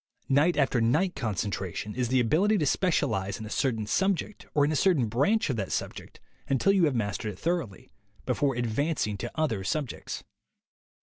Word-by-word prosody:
Night 150 +6 +3
after 135 -4 +2
night 160 +11 +2
concentration 100 -3 -3
is 125 +1 -1
the 130 +2 +2
ability 170 - +3
to 155 - +1
specialize 115 - 0
in 110 - -6
a 110 - -8
certain 115 -6 0
subject 190 - -1
or 145 -1 +4
in 150 - 0
a - - 0
certain 155 -6 +3
branch 145 - +1
of 120 - -3
that 100 -3 -3
sub - - -2
ject - - -12 0.3
until 135 +9 +3
you 190 -4 +4
have 145 -4 0
mastered 105 0 -2
it - - -14
thoroughly, 160 - -3 0.3
before 140 -3 +1
advancing 120 0 -1
to 120 +5 -5
other 140 -11 0
subjects. 135 +5 -3
130 Hz, 180 wpm, -28 LUFS, 110-160 Hz, 0.3 s, or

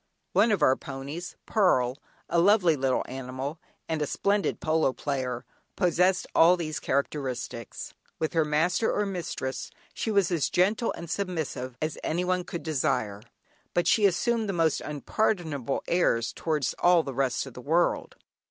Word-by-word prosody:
One 205 +5 +4
of 195 -7 +2
our 130 - +5
ponies, 140 +7 -7
"Pearl," 130 - +2 0.3
a 170 - +2
lovely 180 -3 +5
little 130 -2 0
animal, 130 +4 -5 0.3
and 160 -2 -1
a 150 - 0
splendid 200 +5 0
polo 155 -4 +2
player, 130 -4 -3 0.3
possessed 180 +1 +2
all 175 +2 +6
these 155 -3 -3
characteristics. 130 -4 -3 0.2
With 160 - -2
her 165 -1 +3
master 160 +8 +1
or 210 - 0
mistress 170 -8 -4 0.2
she - - -3
was 200 -3 +2
as 165 -5 +1
gentle 210 +6 +2
and 170 - -8
submissive 160 -9 -3
as 155 0 -3
anyone 180 +2 0
could 170 - -6
desire, 130 -9 -1 0.5
but 175 - +2
she 210 -2 +5
assumed 225 +3 0
the - - 0
most 165 -3 +2
unpardonable 150 - -1
airs 115 -10 +2
towards 150 -5 -1
all 175 -2 +5
the 135 - -5
rest 130 -1 0
of 135 - -10
the 125 - -9
world. 165 +6 +1
160 Hz, 150 wpm, -27 LUFS, 135-180 Hz, 0.5 s, all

